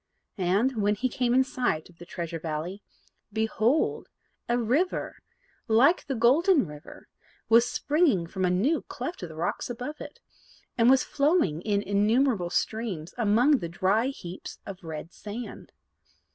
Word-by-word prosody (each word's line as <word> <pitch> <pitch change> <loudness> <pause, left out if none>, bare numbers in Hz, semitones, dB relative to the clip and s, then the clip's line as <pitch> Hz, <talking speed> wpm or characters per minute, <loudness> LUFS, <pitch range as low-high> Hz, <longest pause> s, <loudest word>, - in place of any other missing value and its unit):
And, 210 +7 +1
when 205 +1 +2
he 255 +5 0
came 250 -1 -1
in 260 - +5
sight 245 -11 -2
of 175 -2 -22
the 175 - -11
Treasure 170 -2 -5
Valley, 160 +5 -4 0.5
behold, 220 +5 0 0.4
a 240 - +2
river, 260 +11 0 0.5
like 250 +10 +4
the 270 - -2
Golden 275 - +4
River 150 -2 -12 0.4
was 230 +2 +5
springing 290 - +2
from 185 +3 -4
a 180 - +3
new 220 - +1
cleft 350 - -6
of 175 - -6
the 160 - -10
rocks 165 +8 -2
above 250 +5 -6
it, 290 - -9 0.6
and 235 0 +4
was 265 0 +5
flowing 280 - +1
in 205 0 0
innumerable 210 0 +2
streams 190 -3 -2
among 245 +5 +3
the 170 - -5
dry 195 +7 +1
heaps 185 -9 -7
of 190 -1 -9
red 160 0 -7
sand. 215 +4 -8
220 Hz, 150 wpm, -27 LUFS, 180-255 Hz, 0.6 s, in